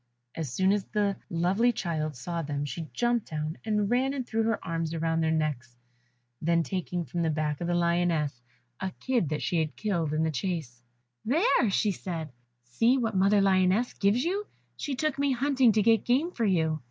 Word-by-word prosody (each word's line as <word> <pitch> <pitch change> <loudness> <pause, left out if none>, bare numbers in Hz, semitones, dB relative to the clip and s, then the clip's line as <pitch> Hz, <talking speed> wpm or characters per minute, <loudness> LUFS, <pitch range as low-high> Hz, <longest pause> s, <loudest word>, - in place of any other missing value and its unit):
As 155 -6 -4
soon 190 +8 +2
as 205 -2 -1
the 205 -2 0
lovely 185 +8 +2
child 155 - -3
saw 170 +7 -4
them 145 -1 -3
she 155 +2 -6
jumped 240 -2 0
down, 155 +1 -4
and 210 -2 0
ran 260 +5 +1
and 260 -3 -3
threw 225 -1 -1
her 225 0 +1
arms 165 -1 -2
round 165 0 0
their 160 - +1
necks; 150 -6 -2 0.6
then 170 +1 +2
taking 180 -1 -3
from 175 - -3
the 165 - +1
back 150 -1 -1
of 170 - -2
the 175 - +1
lioness 170 -6 +1 0.4
a 190 - -2
kid 245 - 0
that 150 -1 -2
she 175 - +1
had 155 -3 -2
killed 175 -8 -1
in 155 +1 +1
the 160 - +1
chase, 150 -6 -4 0.4
"There," 280 - +3
said - - -2
she, 180 -6 -1 0.3
"see 230 - +2
what 225 -4 -1
mother 200 +2 +4
lioness 190 +4 +3
gives 205 +6 +2
you; 395 +4 -1 0.3
she 285 -3 -3
took 280 +1 -1
me 280 -1 +2
hunting 260 -1 +3
to 210 0 +3
get 225 -1 +4
game 275 +8 +1
for 235 -9 -1
you." 160 -5 +1
180 Hz, 195 wpm, -28 LUFS, 160-225 Hz, 0.6 s, mother